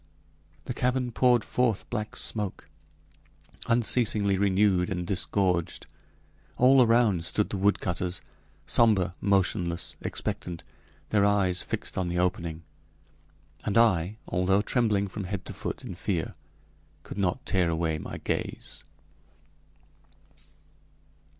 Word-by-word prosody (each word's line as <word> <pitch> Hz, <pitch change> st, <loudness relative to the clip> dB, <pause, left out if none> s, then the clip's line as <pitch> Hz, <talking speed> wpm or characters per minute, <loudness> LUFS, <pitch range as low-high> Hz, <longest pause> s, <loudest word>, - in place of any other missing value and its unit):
This -, -, -3 dB
cavern 125 Hz, 0 st, 0 dB
poured 120 Hz, 0 st, +3 dB
forth 120 Hz, -5 st, 0 dB
black 110 Hz, -3 st, -3 dB
smoke, 105 Hz, -4 st, 0 dB, 1.0 s
unceasingly 110 Hz, -4 st, +2 dB
renewed 95 Hz, -2 st, +2 dB
and 90 Hz, -2 st, -3 dB
disgorged. 90 Hz, -1 st, 0 dB, 0.7 s
All 130 Hz, +1 st, +6 dB
around 115 Hz, -7 st, +3 dB
stood 95 Hz, +5 st, -1 dB
the 100 Hz, -, -2 dB
woodcutters, 90 Hz, -2 st, 0 dB, 0.5 s
somber, 100 Hz, -7 st, +3 dB
motionless, 95 Hz, -3 st, +1 dB
expectant, 85 Hz, -2 st, -4 dB, 0.5 s
their 105 Hz, -2 st, +3 dB
eyes 100 Hz, -3 st, +2 dB
fixed -, -, -4 dB
on 90 Hz, -, -1 dB
the 85 Hz, -, -2 dB
opening; 85 Hz, -2 st, -1 dB, 1.0 s
and 105 Hz, -, 0 dB
I, 105 Hz, -3 st, +3 dB
although 95 Hz, +2 st, +1 dB
trembling 105 Hz, -5 st, +1 dB
from 100 Hz, 0 st, -6 dB
head 95 Hz, 0 st, -5 dB
to -, -, -7 dB
foot -, -, -5 dB
in -, -, -6 dB
fear, -, -, -3 dB, 0.7 s
could -, -, -8 dB
not 100 Hz, +8 st, -1 dB
tear 90 Hz, -4 st, +1 dB
away 80 Hz, -1 st, -1 dB
my -, -, -7 dB
gaze. -, -, -4 dB
100 Hz, 110 wpm, -27 LUFS, 90-110 Hz, 1.0 s, All